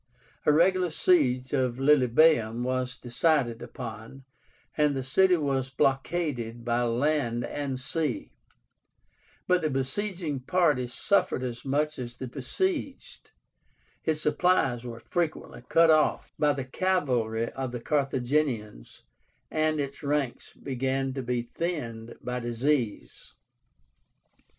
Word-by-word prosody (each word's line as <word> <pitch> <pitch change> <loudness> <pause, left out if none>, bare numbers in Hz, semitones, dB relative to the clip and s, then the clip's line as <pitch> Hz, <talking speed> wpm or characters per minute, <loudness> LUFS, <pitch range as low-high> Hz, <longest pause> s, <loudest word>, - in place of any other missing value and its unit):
A - - +7
regular 180 +3 +3
siege 135 -7 +2
of 130 -3 +1
Lilybaeum 130 -3 +4
was 130 0 -2
decided 120 -2 +1
upon, 115 +2 -8 0.5
and 150 -2 +2
the 135 - -2
city 180 +7 +4
was 135 -4 -1
blockaded 135 -4 -1
by 120 0 +1
land 120 0 0
and 140 -3 -3
sea; 130 - -2 1.1
but 180 0 +3
the 155 - 0
besieging 150 +3 -2
party 145 -3 +2
suffered 130 - +1
as 120 -2 -5
much 150 +2 -1
as 120 -1 -6
the 130 - -5
besieged, 275 - -3 0.7
its 155 -1 0
supplies 150 -6 +2
were 115 -1 -7
frequently 160 -6 -3
cut 165 0 +6
off 155 -1 +2
by 150 -1 +4
the 135 -2 -3
cavalry 125 -9 0
of 130 -2 -4
the 120 - -4
Carthaginians, 130 - -1 0.5
and 155 -1 +1
its 140 -1 -4
ranks 145 -3 -2
began 135 0 -2
to 135 - -3
be 125 -1 -1
thinned 120 -6 -4
by 125 0 -3
disease. 120 - -2
135 Hz, 115 wpm, -27 LUFS, 120-155 Hz, 1.1 s, A